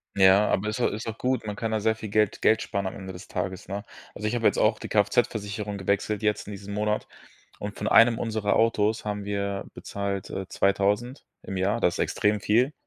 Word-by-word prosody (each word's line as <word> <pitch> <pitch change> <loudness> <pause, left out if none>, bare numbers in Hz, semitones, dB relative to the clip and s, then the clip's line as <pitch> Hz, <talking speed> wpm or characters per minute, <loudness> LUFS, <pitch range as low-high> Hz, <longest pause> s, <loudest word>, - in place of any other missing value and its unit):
Ja, 95 +2 +6
aber 100 - 0
ist 110 +3 -3
au 120 - +3
ist 110 +3 -5
auch 115 0 -4
gut. 125 -3 -1
Man 105 - -3
kann 115 +1 -3
da 110 - +1
sehr 110 +1 +1
viel 110 -1 -7
Geld 105 -1 +2
Geld 110 +1 +4
sparen 100 -1 -2
am 95 - -3
Ende 95 -1 -7
des 90 - -10
Tages, 95 0 -4
ne? 100 +1 -4 0.3
Also 105 - -4
ich 115 - -1
habe 115 - -1
jetzt - - +4
auch 110 0 +3
die - - -7
KFZ-Versicherung 105 -1 0
gewechselt 100 +2 0
jetzt 105 -1 0
in - - -6
diesem 100 0 -7
Monat 105 0 -1 0.5
und 105 0 -6
von 105 - -2
einem 115 0 +6
unserer 110 -3 0
Autos 110 -1 +2
haben 105 -1 -3
wir 100 -1 -2
bezahlt, 100 -1 -4
äh, 95 -1 -5
2.000 105 +7 0 0.2
im 95 - -5
Jahr, 100 +5 +1
das 90 - +2
extrem 105 0 +1
viel. 120 +9 +2
105 Hz, 220 wpm, -26 LUFS, 100-110 Hz, 0.5 s, Ja